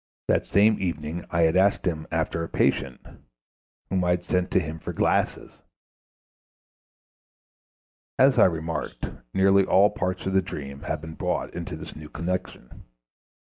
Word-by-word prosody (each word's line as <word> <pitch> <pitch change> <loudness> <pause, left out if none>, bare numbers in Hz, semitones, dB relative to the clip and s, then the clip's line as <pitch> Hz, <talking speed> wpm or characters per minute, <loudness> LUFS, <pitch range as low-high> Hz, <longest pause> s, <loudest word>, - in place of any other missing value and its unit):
That - - +1
same 105 +3 +4
evening 85 -2 -3
I 85 -1 +2
had 80 +1 +3
asked 95 +2 +3
him 80 -3 -2
after 80 +1 -1
a 80 - -5
patient 65 -2 0 0.9
whom 95 -1 +1
I 90 - +1
had 90 0 +1
sent 90 -1 0
to - - +3
him 80 -2 -5
for - - -6
glasses. - - 0 2.7
As 130 -1 +5
I - - +8
remarked, 80 -2 -2 0.3
nearly 95 +3 +4
all 95 +2 +4
parts 95 -3 -3
of 95 - -1
the 95 - +4
dream 70 -6 -7
have 70 - -4
been 80 0 -8
brought - - -2
into - - -5
this - - -9
new 75 -1 -10
connection. 85 -6 -5
90 Hz, 150 wpm, -25 LUFS, 80-95 Hz, 2.7 s, I